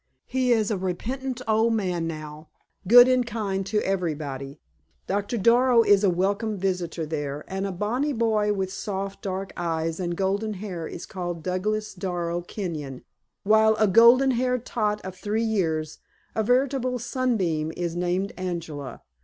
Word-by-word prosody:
He 255 -1 0
is 220 -2 +2
a 200 - -1
repentant 250 +8 -3
old 225 +1 +3
man 180 -5 -1
now 155 -1 -7 0.4
good 245 +4 +9
and 255 -1 +3
kind 210 -5 -2
to 210 +1 +1
everybody. 150 -7 -3 0.5
Doctor 205 +4 -1
Darrow 235 +3 +5
is 205 -2 +4
a 200 - +5
welcome 200 +4 0
visitor 180 -3 -2
there, 145 -2 -4
and 195 +1 -3
a - - -3
bonny 225 +10 -1
boy 220 -4 +1
with 190 -2 -2
soft, 195 -1 -4
dark 190 0 -4
eyes 165 -1 -2
and 175 -1 -2
golden 200 +3 -1
hair 180 -5 -5
is 170 - -7
called 175 -4 -5
Douglas 210 +4 -2
Darrow 175 -2 -3
Kenyon, 160 -8 -6 0.4
while 220 +1 +5
a 215 - +3
golden 235 +6 +6
haired 250 0 0
tot 210 -3 -1
of 190 -1 -6
three 210 +4 -1
years 160 -8 -1 0.3
a 220 - 0
veritable 255 +2 +1
sunbeam 220 - -1
is 170 -1 -2
named 180 +3 -1
Angela. 165 -8 -5
195 Hz, 155 wpm, -25 LUFS, 175-225 Hz, 0.5 s, good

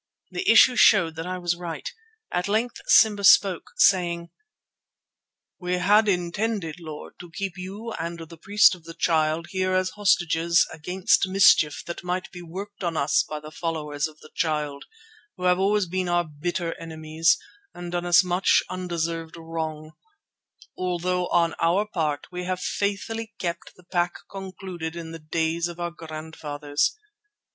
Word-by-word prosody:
The 385 +2 -2
issue 250 - +7
showed 175 -9 +5
that 165 +2 -4
I 185 0 -3
was 175 -1 -1
right. 175 - -6 0.4
At 180 +2 -1
length 225 +4 -1
Simba 210 -3 +5
spoke, 195 -2 +5
saying: 170 -3 +3 1.3
"We 180 -1 -2
had 205 +4 +4
intended, 180 -1 -1
Lord, 155 -3 -9
to 175 - -10
keep 195 +2 -4
you 200 +5 -7
and 170 +1 -4
the 165 0 -10
priest 205 +5 +5
of 175 -3 -11
the 165 0 -9
Child 165 0 +1
here 185 0 0
as 185 0 +1
hostages 170 -4 +2
against 180 +4 +1
mischief 185 -6 +4
that 170 - -6
might 180 +1 -3
be 175 - -9
worked 195 +4 -8
on 170 -2 -1
us 140 0 +3
by 150 - -6
the 155 +1 -11
followers 155 -3 -3
of 155 -1 -15
the 155 - -15
Child, 150 -3 -2 0.5
who - - -8
have 180 0 +3
always 200 +1 +2
been 185 +1 -2
our 175 0 +2
bitter 165 +2 -3
enemies 160 0 +1 0.4
and 175 0 -7
done 175 0 -2
us 175 +1 +6
much 180 +1 +3
undeserved 170 -2 -3
wrong, 160 -1 -5 0.8
although 180 0 -1
on 170 -1 +2
our 175 +5 +2
part 155 -8 -2
we 180 0 -5
have 185 0 -2
faithfully 210 +4 -3
kept 170 -1 -4
the 180 - -19
pact 175 0 -2
concluded 185 -4 -6
in 165 -1 -7
the 165 - -8
days 160 +2 -1
of 175 0 -9
our 175 0 -2
grandfathers. 155 - -3
175 Hz, 155 wpm, -25 LUFS, 165-185 Hz, 1.3 s, issue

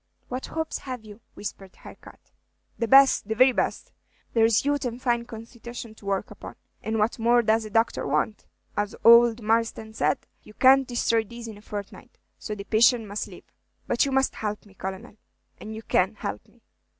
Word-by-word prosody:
"What 255 +1 -4
hopes 320 0 -3
have 250 -4 -7
you?" 210 +1 -13
whispered 195 -2 -8
Harcourt. - - -15 0.5
"The 230 - 0
best, 270 -4 +6
the 220 - -2
very 255 +3 +6
best. - - -2 0.4
There 225 -1 +4
's 230 +3 +2
youth 285 -1 0
and 240 -2 -3
a - - -16
fine 240 -2 0
constitution 235 0 -9
to 210 -2 -14
work 195 -1 -2
upon; - - -10 0.3
and 220 0 -2
what 220 +3 0
more 240 +1 +4
does 220 0 +2
a - - -7
doctor 225 -5 +1
want? 150 +9 -1 0.3
As 205 0 -2
ould 235 0 +7
Marsden 225 0 0
said, - - 0 0.2
'You 215 - -16
can't 265 0 +5
destroy 230 -2 +1
these 235 +2 -10
in 215 -2 -9
a - - -17
fortnight, 205 -2 -9 0.2
so 210 - -5
the 200 - -7
patient 230 +2 +3
must 205 +1 -4
live.' - - -15 0.3
But 235 - +2
you 275 - -1
must 265 0 +2
help 210 -1 -4
me, 200 - -18
Colonel, 190 +2 -7 0.4
and 220 0 -8
you 220 - -8
can 190 +2 +1
help 105 - -6
me." - - -27
225 Hz, 195 wpm, -25 LUFS, 210-240 Hz, 0.5 s, ould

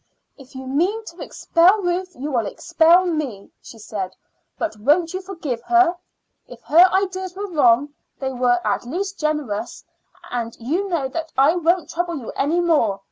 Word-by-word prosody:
"If 270 -2 -17
you 260 0 -7
mean 360 +12 0
to 340 -3 -11
expel 370 +5 +2
Ruth 360 +1 -2
you 290 +4 -5
will 235 -5 0
expel 340 - +3
me," 290 - -3
she 230 - -13
said. 200 -4 -6 0.4
"But 325 - -3
won't 320 - +2
you 370 - -3
forgive 335 -11 -5
her? 355 +5 +3 0.5
If - - -13
her 350 +4 +6
ideas 375 -1 -1
were 405 +2 -4
wrong, 285 -2 +3 0.3
they 265 -1 -2
were 245 -1 +2
at - - 0
least 380 +10 -4
generous; 280 -8 -3 0.5
and 235 -2 -4
you 335 +12 -2
know 325 -7 -1
that 320 +3 -5
I 280 +5 +5
won't 345 -1 +1
trouble 345 -1 -2
you 240 -5 -7
any 310 +5 0
more. 290 - +2
320 Hz, 170 wpm, -21 LUFS, 255-360 Hz, 0.5 s, her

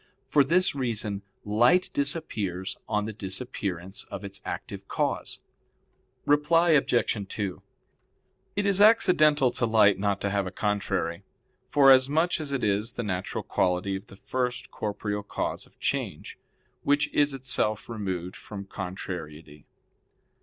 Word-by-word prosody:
For 145 - +4
this 180 +7 +2
reason 110 -7 -2 0.2
light 120 - +3
disappears 105 - -2
on 105 -1 +1
the 110 - -4
disappearance 95 -3 -4
of 100 - -7
its 100 0 -7
active - - -6
cause. - - -2 0.8
Reply 165 +4 +4
Obj. 120 -8 +2
2: 100 -4 -4 0.9
It 205 +1 0
is 200 0 +2
accidental 155 - +5
to 120 - 0
light 105 -3 +5
not 100 -1 0
to 100 - -1
have 100 -1 0
a - - -5
contrary, 100 -4 -1 0.5
forasmuch 140 +5 +5
as 145 -2 -5
it 135 -2 -1
is 105 +3 0
the 120 - -3
natural 95 -3 -3
quality 90 +2 0
of 95 +2 -7
the 100 - -14
first 125 +2 -3
corporeal 105 -1 -3
cause 100 - -4
of - - -29
change, - - -3 0.4
which 145 +1 +2
is 145 -1 +2
itself 120 -5 -1
removed 95 -5 -4
from 100 -2 -8
contrariety. 80 -6 -7
105 Hz, 130 wpm, -27 LUFS, 100-140 Hz, 0.9 s, accidental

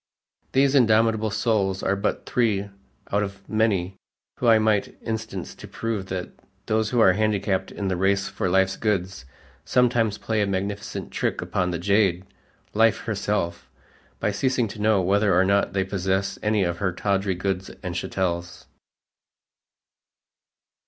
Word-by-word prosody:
These 135 +1 +4
indomitable 110 -3 +3
souls 105 -3 0
are 100 - +1
but 100 +2 -2
three 105 -5 0 0.4
out 100 - +2
of 100 -1 -6
many 100 -4 0 0.4
whom 120 - +3
I 115 - +7
might 110 -2 +1
instance 110 -1 -4
to - - -11
prove 110 -4 -3
that 95 -1 -4 0.3
those 110 0 +1
who 120 - +1
are 95 -5 +6
handicapped 100 -2 0
in 100 - -4
the 95 - 0
race 100 +2 +1
for 95 - -2
life's 95 +1 +2
goods, 95 -9 -1 0.4
sometimes 115 -4 +2
play 110 -1 -1
a 100 - +1
magnificent 100 +1 -4
trick - - -1
upon 90 -1 -1
the 85 - -2
jade, 95 0 +2 0.5
life 115 +1 +3
herself, 95 - -2 0.5
by 105 - 0
ceasing 125 +3 0
to 105 - -8
know 105 -3 +3
whether 100 0 +3
or 95 - +4
not 100 -2 +2
they 95 -1 +1
possess 95 0 -1
any 105 -1 +2
of 85 -1 -2
her 95 -2 0
tawdry 95 +1 0
goods 95 +1 -2
and 90 -2 -3
chattels. 90 -1 -3
100 Hz, 150 wpm, -24 LUFS, 95-110 Hz, 0.5 s, I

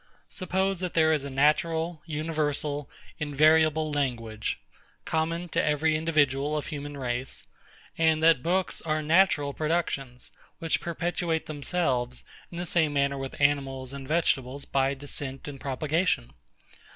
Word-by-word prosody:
Suppose 190 0 -1
that 180 -1 -3
there 160 -1 +5
is 145 -3 0
a - - -4
natural, 160 +4 +1
universal, 150 -2 -2 0.3
invariable 155 +1 +3
language, 115 -7 -2 0.5
common 165 +2 -1
to - - +1
every 150 +1 +2
individual 150 -2 +1
of 150 - -3
human 145 -1 -6
race; 125 0 -3 0.5
and 160 -1 +3
that 160 -5 +6
books 185 +4 0
are 155 -1 -1
natural 155 -3 +3
productions, 145 -6 -2 0.3
which 165 -1 0
perpetuate 170 -1 -1
themselves 140 -5 -1 0.3
in 170 - -8
the 175 - -2
same 160 -3 +3
manner 140 -1 +1
with 135 0 -6
animals 135 -2 +1
and 135 -1 -7
vegetables, 140 -4 0
by 135 0 +1
descent 135 -1 -5
and 140 -2 -8
propagation. 140 - 0
150 Hz, 130 wpm, -27 LUFS, 140-165 Hz, 0.5 s, that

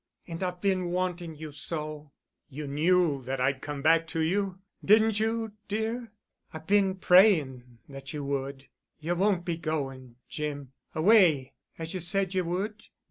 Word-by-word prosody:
And 165 0 -7
I've 180 -1 -3
been 190 -2 +1
wanting 175 -2 -2
you 155 0 -8
so——" 150 -1 -5 0.4
"You 150 +2 -6
knew 155 0 +2
that 135 +1 -3
I'd 130 +1 0
come 145 -1 -5
back 165 +1 +4
to 165 - -3
you, 190 +3 0 0.3
didn't 215 +1 +4
you, 225 0 -1 0.2
dear?" 220 +3 -3 0.4
"I've 160 -2 -9
been 195 0 +3
praying 155 - +4
that 135 -1 -9
you 150 -1 -5
would—you 140 +4 -5
won't 185 -1 +1
be 170 -2 -2
going, 135 -6 -4
Jim—away—as 150 - 0
you 185 - -3
said 190 +2 0
you 185 -2 0
would?" 205 +5 -3
165 Hz, 140 wpm, -28 LUFS, 145-190 Hz, 0.4 s, back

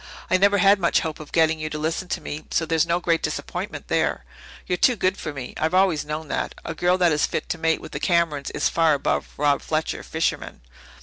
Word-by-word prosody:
I 185 - +5
never 200 +2 +4
had 195 +1 +5
much 170 -2 +2
hope 160 -1 -4
of 155 - -10
getting 160 -1 +3
you 155 0 -3
to 155 - -4
listen 160 +4 -2
to - - -3
me, 150 +1 -6
so 165 - 0
there's 160 0 +1
no 170 +1 +1
great 170 -2 +1
disappointment - - -4
there. - - 0 0.4
You're 180 - -1
too 250 - +4
good 185 -2 +1
for 155 - -5
me 130 -3 -7
I've 160 +3 0
always 185 -5 +3
known 150 +1 -5
that. - - -2
A 165 - -3
girl 175 +3 +2
that 175 -2 +3
is 150 -1 +2
fit - - -3
to 165 - -2
mate 160 0 +1
with - - -10
the - - -4
Camerons 170 -6 +1
is 150 - +2
far 165 -2 +3
above 140 - -1
Rob 145 -1 +2
Fletcher, 155 0 -2
fisherman." 160 - -3
160 Hz, 235 wpm, -23 LUFS, 155-180 Hz, 0.4 s, I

